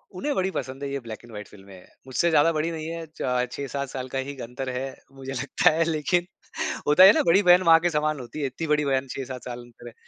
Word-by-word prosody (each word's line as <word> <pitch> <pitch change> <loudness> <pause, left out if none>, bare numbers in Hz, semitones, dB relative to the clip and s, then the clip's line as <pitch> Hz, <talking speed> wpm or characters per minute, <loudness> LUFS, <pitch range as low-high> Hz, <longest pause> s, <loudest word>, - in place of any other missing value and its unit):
उन्हें 285 +10 -2
बड़ी 190 0 0
पसंद 135 -3 -5
है 140 - -3
ये 140 - -2
ब्लैक 115 -3 -8
एंड 120 - -14
व्हाइट 105 -1 -8
फ़िल्में। 95 -2 -15 0.2
मुझसे 130 +7 +1
ज़्यादा 160 0 +4
बड़ी 155 +2 -1
नहीं 160 -1 -5
है 165 0 -5
च 125 0 0
6-7 140 0 -4
साल 130 -1 -5
का 135 - -4
ही 140 +2 -5
अंतर 125 +3 -5
है, 130 +1 -4 0.2
मुझे 135 0 -7
लगता 125 - +2
है 160 +2 +1
लेकिन 165 +2 0 0.6
होता 150 +5 +7
है 190 - +11
ना - - +2
बड़ी 190 +5 +5
बहन 180 0 +6
माँ 165 -1 +7
के 175 +1 +1
समान 155 -2 0
होती 125 +4 -8
है, - - 0
इतनी 155 +5 -5
बड़ी 150 -1 +2
बहन 135 -1 0
6-7 130 -2 -6
साल 120 -1 -6
अंतर 120 0 -14
है। 120 - -10
140 Hz, 250 wpm, -25 LUFS, 125-165 Hz, 0.6 s, है